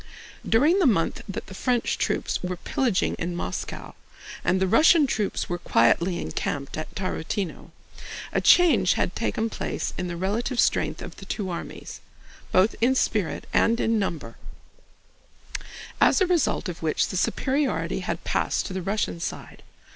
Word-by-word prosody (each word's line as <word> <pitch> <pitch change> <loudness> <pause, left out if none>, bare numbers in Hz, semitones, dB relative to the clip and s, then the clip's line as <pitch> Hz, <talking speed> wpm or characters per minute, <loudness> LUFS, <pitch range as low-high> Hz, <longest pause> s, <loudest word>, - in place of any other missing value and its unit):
During 300 - +4
the 355 - +4
month 180 -9 +1
that 195 - -5
the 190 - -11
French 245 +4 0
troops - - -1
were 180 0 -3
pillaging 230 +2 0
in 175 +1 -3
Moscow 90 - -5 0.5
and 185 - +2
the 190 - +2
Russian 310 - +6
troops 215 -6 -1
were 175 0 -3
quietly 170 +7 +2
encamped 140 -1 -3
at 155 - -6
Tarútino, 185 -1 -3 0.6
a - - +2
change 255 - +5
had 180 - -1
taken 225 0 -1
place 225 - -3
in 180 - -2
the 175 -1 -5
relative 225 +7 -1
strength - - +1
of - - -9
the - - -10
two 195 -4 -3
armies—both 185 +3 -3
in 255 +3 +4
spirit 210 -8 0
and 230 +1 +3
in 225 -1 +2
number—as 170 - -4
a 380 - +4
result 350 - +1
of 175 -2 -6
which 160 -1 +1
the - - -5
superiority 275 +8 0
had - - -4
passed - - 0
to 190 - -5
the 190 - -3
Russian 195 -2 -1
side. 170 - -6
195 Hz, 150 wpm, -25 LUFS, 175-245 Hz, 0.6 s, Russian